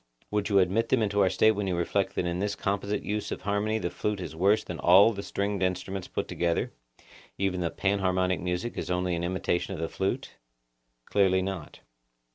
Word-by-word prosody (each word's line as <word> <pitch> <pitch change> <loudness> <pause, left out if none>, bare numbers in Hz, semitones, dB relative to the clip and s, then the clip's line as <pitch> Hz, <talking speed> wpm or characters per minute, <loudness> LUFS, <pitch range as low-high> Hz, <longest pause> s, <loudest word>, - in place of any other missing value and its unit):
Would 105 0 0
you 100 - +3
admit 100 +5 +2
them 125 -4 +3
into 100 -1 +1
our 95 - +4
State 110 - +4
when 105 -2 -2
you 90 - 0
reflect 90 +3 0
that - - 0
in 85 0 -2
this 100 +1 -1
composite 100 +1 -2
use 105 0 -3
of - - -4
harmony 105 +2 0
the 90 -5 -3
flute 105 -1 -2
is 90 -3 -6
worse 100 +6 +3
than 90 - -6
all 100 +6 +6
the 100 - -5
stringed 100 0 -2
instruments 95 +1 -2
put - - -3
together; 85 -1 -1 0.6
even 95 -2 0
the 85 - 0
panharmonic 95 -1 +1
music 90 +6 -3
is - - -4
only 90 0 0
an 85 - -3
imitation 95 +1 -1
of - - -7
the 80 - -1
flute? 95 +3 -2 0.7
Clearly 95 -2 +3
not. 95 -5 -6
95 Hz, 200 wpm, -28 LUFS, 90-100 Hz, 0.7 s, all